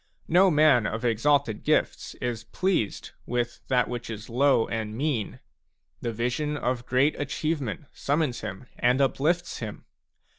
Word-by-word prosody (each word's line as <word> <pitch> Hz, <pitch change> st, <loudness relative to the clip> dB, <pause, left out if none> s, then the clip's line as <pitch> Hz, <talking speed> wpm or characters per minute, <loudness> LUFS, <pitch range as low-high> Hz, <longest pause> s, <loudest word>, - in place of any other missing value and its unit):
No 185 Hz, +3 st, +5 dB
man 150 Hz, -8 st, +5 dB
of 110 Hz, +2 st, -3 dB
exalted 120 Hz, 0 st, +2 dB
gifts -, -, 0 dB
is 115 Hz, -2 st, -4 dB
pleased 185 Hz, -, -1 dB, 0.2 s
with 120 Hz, 0 st, -2 dB
that 125 Hz, -2 st, +2 dB
which 120 Hz, -1 st, -5 dB
is 110 Hz, +1 st, -7 dB
low 130 Hz, -1 st, +3 dB
and 110 Hz, -1 st, -3 dB
mean; 135 Hz, -7 st, -1 dB, 0.6 s
the 120 Hz, -, -2 dB
vision 125 Hz, +6 st, -1 dB
of 125 Hz, -2 st, -2 dB
great 135 Hz, +4 st, +3 dB
achieve 155 Hz, +2 st, -1 dB
ment 120 Hz, +2 st, -5 dB
summons 145 Hz, -3 st, -1 dB
him 95 Hz, +7 st, -6 dB
and 125 Hz, +2 st, +3 dB
uplifts 155 Hz, +6 st, +1 dB
him. 110 Hz, -3 st, -7 dB
125 Hz, 145 wpm, -26 LUFS, 115-150 Hz, 0.6 s, No